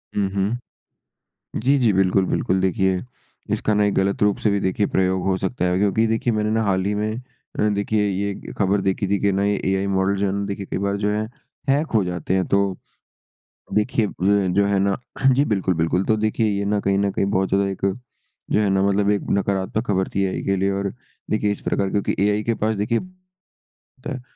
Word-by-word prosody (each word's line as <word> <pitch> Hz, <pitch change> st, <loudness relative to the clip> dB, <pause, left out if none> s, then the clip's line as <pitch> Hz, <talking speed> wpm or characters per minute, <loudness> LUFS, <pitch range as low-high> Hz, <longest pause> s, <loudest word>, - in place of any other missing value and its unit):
हुँ, 100 Hz, -2 st, +1 dB
हुँ। 100 Hz, +4 st, 0 dB, 1.0 s
जी, 140 Hz, +4 st, +3 dB
जी, 115 Hz, -5 st, +3 dB
बिल्कुल, 95 Hz, 0 st, +3 dB
बिल्कुल। 95 Hz, +1 st, 0 dB
देखिए 95 Hz, -1 st, +1 dB, 0.5 s
इसका 105 Hz, -, +1 dB
ना 105 Hz, -, +3 dB
एक 100 Hz, -, +1 dB
गलत 100 Hz, +1 st, 0 dB
रूप 105 Hz, -1 st, +3 dB
से 105 Hz, -, +1 dB
भी 100 Hz, -, +1 dB
देखिए 95 Hz, +2 st, 0 dB
प्रयोग 95 Hz, 0 st, +1 dB
हो 95 Hz, -1 st, +2 dB
सकता 95 Hz, +1 st, -2 dB
है, 90 Hz, 0 st, +1 dB
क्योंकि 105 Hz, +3 st, +2 dB
देखिए 115 Hz, +2 st, 0 dB
मैंने 105 Hz, -1 st, 0 dB
ना 110 Hz, +1 st, +1 dB
हाल 95 Hz, -2 st, +1 dB
ही 100 Hz, +1 st, 0 dB
में 110 Hz, +3 st, -2 dB, 0.5 s
देखिए 105 Hz, +1 st, 0 dB
ये 100 Hz, +1 st, -3 dB
खबर 100 Hz, 0 st, +2 dB
देखी 95 Hz, +1 st, 0 dB
थी 100 Hz, 0 st, +1 dB
कि 100 Hz, -, +2 dB
ना 100 Hz, +1 st, +1 dB
ये 100 Hz, 0 st, +1 dB
एआई 95 Hz, +1 st, +1 dB
मॉडल 95 Hz, 0 st, +1 dB
जो 100 Hz, +1 st, 0 dB
है 95 Hz, -, 0 dB
ना 100 Hz, +1 st, -2 dB
देखिए 100 Hz, 0 st, -5 dB
कई -, -, -1 dB
बार 100 Hz, 0 st, -1 dB
जो 105 Hz, +1 st, 0 dB
है 105 Hz, +1 st, 0 dB, 0.5 s
हैक 145 Hz, +4 st, +3 dB
हो 110 Hz, -, +4 dB
जाते 90 Hz, 0 st, -2 dB
हैं। 95 Hz, -1 st, +2 dB
तो 100 Hz, -1 st, +1 dB, 1.0 s
देखिए 105 Hz, 0 st, +1 dB
अ, -, -, -5 dB, 0.4 s
जो 100 Hz, +2 st, +3 dB
है 100 Hz, -1 st, +1 dB
ना 100 Hz, 0 st, +1 dB, 0.4 s
जी 135 Hz, +3 st, +3 dB
बिल्कुल, 95 Hz, -7 st, 0 dB
बिल्कुल। 85 Hz, +4 st, +1 dB
तो 110 Hz, -, +2 dB
देखिए 110 Hz, +1 st, 0 dB
ये 100 Hz, 0 st, -1 dB
ना 100 Hz, 0 st, +1 dB
कहीं 100 Hz, 0 st, +1 dB
न 100 Hz, 0 st, +1 dB
कहीं 100 Hz, -, 0 dB
बहुत 95 Hz, 0 st, +1 dB
ज़्यादा 100 Hz, +1 st, +2 dB
एक 95 Hz, -, -5 dB, 0.7 s
जो 105 Hz, -, +3 dB
है 105 Hz, -, +2 dB
ना 95 Hz, 0 st, +2 dB
मतलब 100 Hz, +1 st, +2 dB
एक 105 Hz, -, +1 dB
नकारात्मक 100 Hz, +3 st, 0 dB
खबर 95 Hz, -2 st, 0 dB
थी, 100 Hz, -, +1 dB
एआई 95 Hz, -, -2 dB
के 100 Hz, 0 st, +1 dB
लिए 95 Hz, +1 st, +1 dB
और 100 Hz, 0 st, -2 dB, 0.4 s
देखिए 105 Hz, -1 st, +1 dB
इस -, -, -6 dB
प्रकार 100 Hz, -1 st, 0 dB
क्योंकि 100 Hz, 0 st, 0 dB
एआइ 105 Hz, +1 st, +2 dB
के 115 Hz, -, +1 dB
पास 110 Hz, 0 st, +1 dB
देखिए 105 Hz, +3 st, 0 dB
ता 185 Hz, 0 st, -17 dB, 0.8 s
है 130 Hz, -, -6 dB
100 Hz, 220 wpm, -22 LUFS, 95-105 Hz, 1.0 s, हो